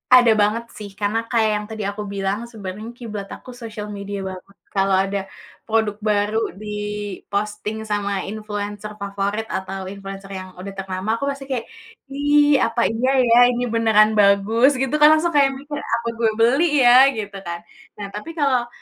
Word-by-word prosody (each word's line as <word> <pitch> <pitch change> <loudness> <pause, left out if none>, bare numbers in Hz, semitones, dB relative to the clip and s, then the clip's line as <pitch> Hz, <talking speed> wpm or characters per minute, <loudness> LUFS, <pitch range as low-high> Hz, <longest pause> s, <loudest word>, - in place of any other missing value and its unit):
Ada 245 -2 +7
banget 215 +3 +1
sih, 210 -1 -7
karena 205 +2 0
kayak 225 -2 +3
yang 210 0 -3
tadi 220 -1 -5
aku 205 +1 -4
bilang, 195 +1 -1
sebenarnya 210 +1 -7
kiblat 210 -5 -6
aku - - -15
sosial 220 -3 -7
media 200 0 -5
banget. 190 +1 -11 0.2
Kalau 195 0 +2
ada 195 +1 -2 0.4
produk 220 -2 0
baru 210 +2 +1 0.2
diposting 210 0 -4
sama 200 -2 -1
influencer 210 0 -5
favorit 200 +2 -2
atau 190 -1 -4
influencer 195 0 -8
yang 185 0 -9
udah 195 +2 -7
ternama, 195 +2 -2
aku 230 - -6
pasti 275 0 -7
kaya, 250 -3 -1 0.5
"Ih, 290 0 +4
apa 230 +1 +1
iya 250 +4 +1
ya, 235 -1 +4 0.2
ini 245 - -1
beneran 220 -2 +5
bagus?" 210 +7 +4
Gitu 265 -1 0
kan, 300 - +8
langsung 335 +2 0
kayak 280 -3 +4
mikir, 290 +2 -6
"Apa 235 0 -2
gue 230 -1 +3
beli 250 +8 +4 0.2
ya?" 250 +2 +8
Gitu 205 -2 -5
kan. 170 0 -4 0.4
Nah, 205 - -6
tapi 210 +11 -7
kalau 265 -6 +1
210 Hz, 165 wpm, -21 LUFS, 200-235 Hz, 0.5 s, kan